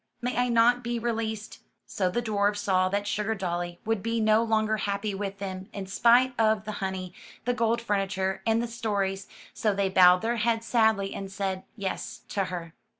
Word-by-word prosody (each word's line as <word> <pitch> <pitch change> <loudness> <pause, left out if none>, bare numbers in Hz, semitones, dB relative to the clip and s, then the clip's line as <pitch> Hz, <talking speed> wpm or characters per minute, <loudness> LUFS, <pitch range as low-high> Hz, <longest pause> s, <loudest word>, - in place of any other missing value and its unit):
May 250 +1 -2
I 245 0 +1
not 240 +1 +4
be 235 0 -2
re 235 +1 -1
leased?" 220 -1 -4 0.3
So 185 -2 -1
the 240 +6 -1
dwarfs 205 -2 +1
saw 185 -2 +2
that 200 +1 0
Sugardolly 185 -5 -2
would 225 -2 0
be 230 +2 -1
no 215 0 +4
longer 220 -1 +1
happy 200 0 -2
with 195 0 -4
them, 190 -1 -6
in 200 -1 -5
spite 240 +6 +4
of 215 -1 +2
the 215 - -3
honey, 190 -2 -3 0.3
the 245 - +1
gold 235 -1 +1
furniture, 195 -2 -1
and 225 +2 +2
the - - -2
stories, 200 -4 -2 0.3
so 210 -2 0
they 195 -1 +1
bowed 180 0 +6
their 235 +1 0
heads 230 0 0
sadly 220 -4 +2
and 195 -1 -6
said, 195 -1 -3
"Yes,'' 200 -4 -4
to 195 -2 0
her. 170 -3 -6
205 Hz, 190 wpm, -27 LUFS, 195-230 Hz, 0.3 s, bowed